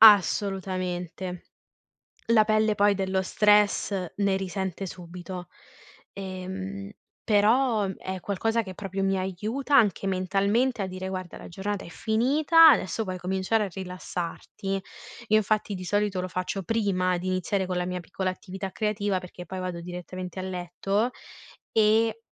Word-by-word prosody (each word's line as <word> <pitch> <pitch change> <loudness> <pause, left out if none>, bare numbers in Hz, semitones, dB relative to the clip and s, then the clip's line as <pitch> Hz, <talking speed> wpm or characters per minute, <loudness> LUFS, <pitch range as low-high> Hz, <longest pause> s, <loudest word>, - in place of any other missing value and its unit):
Assolutamente. 185 -3 +3 0.9
La 220 -2 +5
pelle, 215 0 +3
poi, 205 0 +4
dello 190 0 0
stress 205 -2 +3
ne 200 -1 +2
risente 190 0 -3
subito. 180 0 -8 0.7
Ehm, 190 +1 -6 0.3
però, 220 +1 +3
uhm, 190 - -3
è 190 0 -5
qualcosa 225 +4 0
che 190 - -7
proprio 195 -1 -3
mi 195 0 +2
aiuta 215 +10 -1
anche 205 -5 +4
mentalmente 200 +6 +1
a 195 - -1
dire: 185 0 -5
"Guarda, 185 -2 -5
la - - -10
giornata 195 +3 -3
è - - -10
finita, 285 - +5
adesso 225 -4 +2
puoi 185 -3 -4
cominciare 190 +4 0
a - - -3
rilassarti". 185 +1 -5 0.5
Io, 215 - +5
infatti, 215 -1 +1
di 185 - -6
solito 205 -1 +1
lo 185 - -3
faccio 185 +1 -3
prima 185 -4 +1
di 180 +2 -4
iniziare 185 +1 0
con 185 0 -3
la 180 - 0
mia 180 0 -3
piccola 185 +2 -3
attività 190 +1 -6
creativa 205 -3 0
perché 180 0 -10
poi 190 +2 -6
vado 180 -2 -4
direttamente 180 +1 -6
a - - -3
letto, 190 +5 -1 0.6
e 220 +1 +3
195 Hz, 145 wpm, -27 LUFS, 185-210 Hz, 0.9 s, La